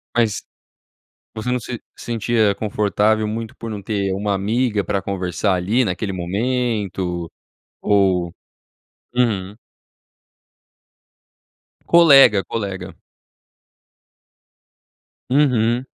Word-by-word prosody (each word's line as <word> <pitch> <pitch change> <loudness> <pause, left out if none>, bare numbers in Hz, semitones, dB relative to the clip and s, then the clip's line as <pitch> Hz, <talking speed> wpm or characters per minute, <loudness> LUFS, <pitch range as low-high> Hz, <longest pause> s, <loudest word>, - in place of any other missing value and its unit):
Mas 115 -3 +1 0.9
você 110 +3 -3
não 125 - 0
se 120 +1 -7
sentia 115 -2 0
confortável 105 +1 +1
muito 110 +1 -5
por 115 - -7
não 105 -2 -5
ter 100 -1 -2
uma 100 +1 -1
amiga 105 +2 0
para 100 +2 -1
conversar, 95 +1 -1
ali 105 +8 +1
naquele 100 +1 -2
momento, 95 -3 -2 0.5
ou 95 -4 +2 0.8
Uhum. 105 -5 0 2.3
Colega, 135 - +7
colega. 95 -2 -5 2.3
Uhum. 125 -3 +2
105 Hz, 85 wpm, -20 LUFS, 95-120 Hz, 2.3 s, Colega